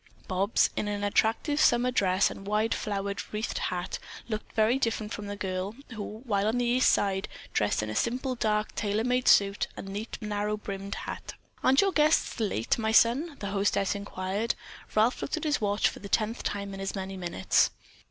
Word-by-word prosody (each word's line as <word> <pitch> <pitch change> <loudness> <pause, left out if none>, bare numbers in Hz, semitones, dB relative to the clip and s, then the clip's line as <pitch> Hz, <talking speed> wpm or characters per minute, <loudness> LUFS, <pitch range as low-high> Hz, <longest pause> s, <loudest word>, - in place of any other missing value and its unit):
Bobs, 195 +3 +2
in 210 - -1
an 205 0 -2
attractive 225 +8 +1
summer 245 +1 +4
dress 190 -5 +3
and 195 - -9
wide 215 +2 +1
flower 200 -1 -2 0.2
wreathed 215 +2 -2
hat, 180 0 -3 0.3
looked 215 -2 -5
very 225 +4 +3
different 225 -3 -1
from 205 0 -5
the 205 - -4
girl 190 +1 -3 0.2
who, 215 +1 -7
while 205 -3 +1
on 225 +3 +1
the 245 - +1
East 245 +2 +4
Side, 195 -1 +1 0.3
dressed 105 0 +1
in 105 - -4
a - - -5
simple 255 - 0
dark 215 -3 0
tailor 210 +1 0
made 250 +1 +1
suit 200 0 +5
and - - -7
a - - -6
neat, 210 +3 -5
narrow 210 0 -2
brimmed 200 -1 -5
hat. - - -6 0.3
"Aren't 265 +2 +5
your 395 -1 +2
guests 305 -5 +2
late, 200 - 0
my 220 -1 +1
son?" 265 +8 +4
the 200 -1 -3
hostess 200 -1 +1
inquired. 200 +2 -2 0.4
Ralph 220 +4 +3
looked 285 - -2
at 315 - -5
his 300 -5 +1
watch 205 0 +2
for - - -5
the 200 - -9
tenth 220 +3 0
time 200 -1 -3
in 195 - -7
as 195 +1 -3
many 190 0 -4
minutes. 175 - +2
210 Hz, 195 wpm, -28 LUFS, 195-230 Hz, 0.4 s, suit